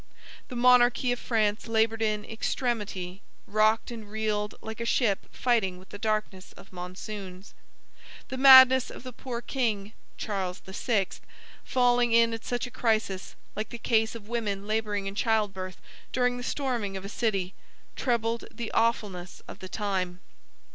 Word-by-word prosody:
The 250 - -8
monarchy 245 0 +5
of 245 - -1
France 215 -1 0
labored 225 0 +1
in 215 -1 0
extremity, 210 -5 -3 0.2
rocked 215 +3 +2
and 220 -3 -8
reeled 210 -1 -2
like 220 0 -8
a - - -2
ship 230 -3 +1
fighting 220 -7 +1
with 185 +1 -16
the 205 - -9
darkness 215 -3 -2
of 195 - -16
monsoons. 185 +1 -8 0.8
The 260 - -4
madness 260 -1 +9
of - - -10
the 255 -1 -8
poor 240 -1 -5
king 220 -5 -2 0.2
(Charles 190 -4 -3
VI.) 195 +1 0 0.6
falling 245 -2 +3
in 230 0 +5
at 225 - -5
such 245 +1 -2
a 250 - -9
crisis, 215 -6 -1 0.2
like 215 +1 -3
the 235 - -6
case 225 -1 +1
of 215 -3 -9
women 210 -4 -2
laboring 210 -2 -1
in 195 - -3
childbirth 200 -4 -1 0.3
during 245 -1 +1
the - - -5
storming 245 -7 -2
of 190 - -8
a - - -4
city, 200 -4 -1 0.4
trebled 235 -2 0
the 235 -2 -6
awfulness 200 -6 -1
of - - -10
the 185 - -8
time. 185 -4 -2
220 Hz, 155 wpm, -28 LUFS, 200-240 Hz, 0.8 s, madness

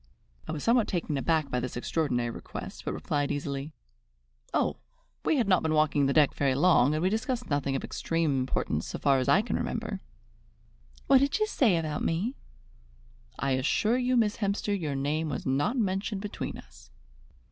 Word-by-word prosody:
I - - -3
was 155 -2 -4
somewhat 235 -1 +3
taken 170 -4 -2
aback 155 +1 0
by 125 - +1
this 125 0 -4
extraordinary 125 -3 -1
request, - - -8
but - - -2
replied 145 -1 -1
easily: 140 +1 -3 0.8
"Oh, - - 0 0.5
we 315 - +2
had 240 - +1
not 185 -2 +4
been 160 -1 0
walking 150 -2 +3
the - - +1
deck 150 -1 +4
very 135 -2 +1
long, 150 -2 +4
and 155 - -1
we 185 - +3
discussed 235 - -2
nothing 140 -1 0
of 135 - -2
extreme 165 -5 0
importance 130 0 -1
so - - -4
far 135 -2 +3
as 130 - -1
I 205 - +5
can 240 - -1
remember." 215 -3 -3 1.1
"What 270 -1 +6
did 280 +1 +1
she 430 - +2
say 240 - +2
about 155 -2 -2
me?" 200 +11 -1 1.0
"I 140 - -1
assure 210 - +2
you, 250 0 +2
Miss 215 -3 +2
Hemster, 205 0 -1
your 155 -8 -2
name 150 +3 -1
was 145 - -4
not 145 - +1
mentioned 195 -1 -1
between 210 0 -5
us." - - -15
160 Hz, 180 wpm, -28 LUFS, 140-210 Hz, 1.1 s, What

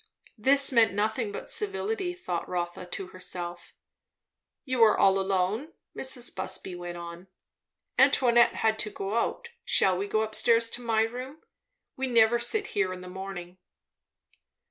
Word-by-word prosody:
This 275 +5 +5
means 230 -4 +4
nothing 215 +2 -1
but - - -7
civility, 405 -3 -2
thought 180 - -4
Rotha 175 0 -4
to 185 +1 -5
herself. 175 -1 -7 0.9
"You 255 -3 -1
are 215 - +5
all 195 0 +4
alone?" 195 - -1 0.2
Mrs. 255 -2 -1
Busby 185 - -2
went 175 0 -7
on. 170 +2 -9 0.7
"Antoinette 240 -2 +5
had 220 0 +1
to 210 - -2
go 200 0 -5
out. 235 - -2
Shall 190 -1 +3
we 195 +3 -3
go 215 +1 +1
up 220 0 -5
stairs, 230 +1 +3
to 245 - -4
my 225 -2 +2
room? 255 +6 -6 0.5
We 265 0 -1
never 235 -1 +4
sit 420 - 0
here 195 -2 +1
in 185 0 -7
the 180 - -10
morning." 185 -1 -8
220 Hz, 150 wpm, -27 LUFS, 185-245 Hz, 0.9 s, This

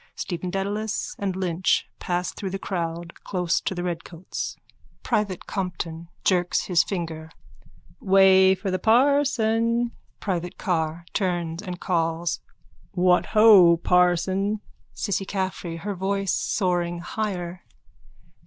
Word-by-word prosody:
Stephen 180 0 -4
Dedalus 200 +3 -2
and 195 -2 -2
Lynch 185 -1 0
pass 180 0 -2
through 195 - -5
the 195 - -3
crowd 170 -3 -4
close 180 -3 0
to 190 - -3
the 175 - -3
redcoats.)_ 175 0 -5 0.5
PRIVATE 200 -4 -1
COMPTON: 170 -4 -4 0.2
(Jerks 180 -2 +2
his 175 -2 +3
finger.) 165 -4 -5 0.7
Way 190 -1 +6
for 190 0 -4
the 185 - -1
parson. 235 -2 +3 0.3
PRIVATE 175 -3 -3
CARR: 165 -3 -1
(Turns 175 -3 -1
and 180 -3 -6
calls.) 165 -1 -1 0.5
What 180 -1 +3
ho, 195 -6 +8
parson! 180 +4 +2 0.3
CISSY 200 -2 -1
CAFFREY: 185 -3 -3
_(Her 205 +1 -3
voice 195 +1 -1
soaring 175 -3 0
higher.) 180 -3 -4
185 Hz, 115 wpm, -24 LUFS, 175-200 Hz, 0.7 s, ho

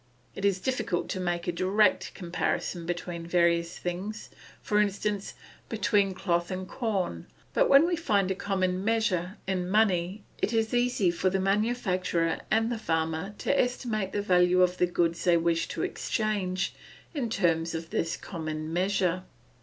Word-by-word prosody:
It 195 - -4
is 195 -2 +2
difficult 220 -6 -1
to 190 - -2
make 175 -1 -2
a - - +2
direct 190 +2 +2
comparison 175 -1 -2
between 175 -1 -4
various 170 -1 +2
things, 190 +5 -5 0.3
for 210 0 +2
instance, 205 0 -2 0.3
between 200 -3 +1
cloth 175 -2 0
and 185 0 -4
corn; 190 - -2 0.3
but - - +3
when 275 +4 +7
we 350 0 +1
find 205 - +1
a - - +3
common 185 -1 -1
measure, 205 -4 0
in 185 -2 -1
money, 195 -1 +2 0.2
it 225 - 0
is 225 0 +1
easy 245 -7 +2
for 185 +2 +1
the 190 +1 0
manufacturer 190 -5 0
and 225 +2 +2
the 235 - -2
farmer 160 +1 -1
to 280 - +1
estimate 230 -6 -1
the 205 - -1
value 180 -1 +4
of 180 0 +1
the 180 - +4
goods 170 -1 0
they 175 -1 +5
wish 165 0 +1
to - - -3
exchange 200 -4 -1 0.4
in 265 -7 -2
terms 165 -5 +1
of 165 0 -6
this 165 - -1
common 155 -3 -5
measure. 185 0 +1
185 Hz, 160 wpm, -28 LUFS, 175-210 Hz, 0.4 s, when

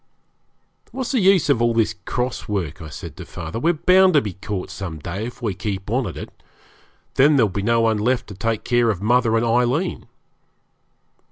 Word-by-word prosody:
'What's 260 -2 -4
the 260 - +2
use 190 -3 +4
of 140 -5 +2
all 120 -1 +2
this 115 -2 +2
cross 125 0 -3
work?' 95 -5 -3
I 80 - -8
said - - -9
to - - -7
father; 115 - -6
'we're 165 +6 +2
bound 185 +2 +4
to 145 - +6
be 105 -6 -5
caught 100 -1 -5
some 85 -5 -6
day 90 +9 -5
if 120 - -11
we 105 -4 0
keep 100 +1 -5
on 125 -1 0
at 85 - -7
it. - - -8 0.8
Then 145 +3 +6
there'll 115 -6 +4
be 100 +2 -3
no 115 +3 +2
one 110 -2 +2
left 125 +3 +1
to - - -7
take 115 +2 -2
care 120 -1 +2
of 100 -3 -2
mother 120 0 +3
and 115 - +1
Aileen.' 125 +9 0
115 Hz, 200 wpm, -21 LUFS, 100-130 Hz, 0.8 s, to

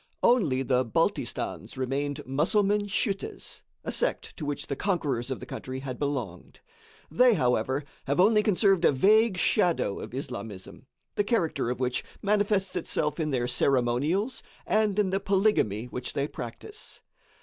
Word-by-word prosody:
Only 160 - +3
the 130 0 +2
Baltistans 115 +2 -2
remained 140 +3 -2
Musselman 205 - +2
schüttes 195 0 -2 0.2
a - - -3
sect - - -1
to 155 - -6
which 145 -1 -3
the 140 - -3
conquerors 140 - -1
of 130 - -3
the - - -8
country 130 0 -6
had 130 -2 -6
belonged. 145 -1 -4 0.5
They, 250 -2 +5
however, 130 - +1 0.2
have 140 +4 0
only 210 +3 +5
conserved 195 -3 +3
a - - +6
vague 210 - +4
shadow 175 - +2
of - - -7
Islamism, 100 -7 -7 0.3
the 205 - +1
character 195 - 0
of 125 -1 -3
which 125 -1 -1 0.2
manifests 205 -1 +1
itself 160 -2 -1
in 155 -1 0
their 125 -3 0
ceremonials 135 - +1 0.2
and 215 -2 +2
in 200 -3 +2
the 195 - +1
polygamy 195 - +1
which 125 0 -5
they 140 +1 -1
practice. 150 - -8
150 Hz, 150 wpm, -27 LUFS, 130-200 Hz, 0.5 s, a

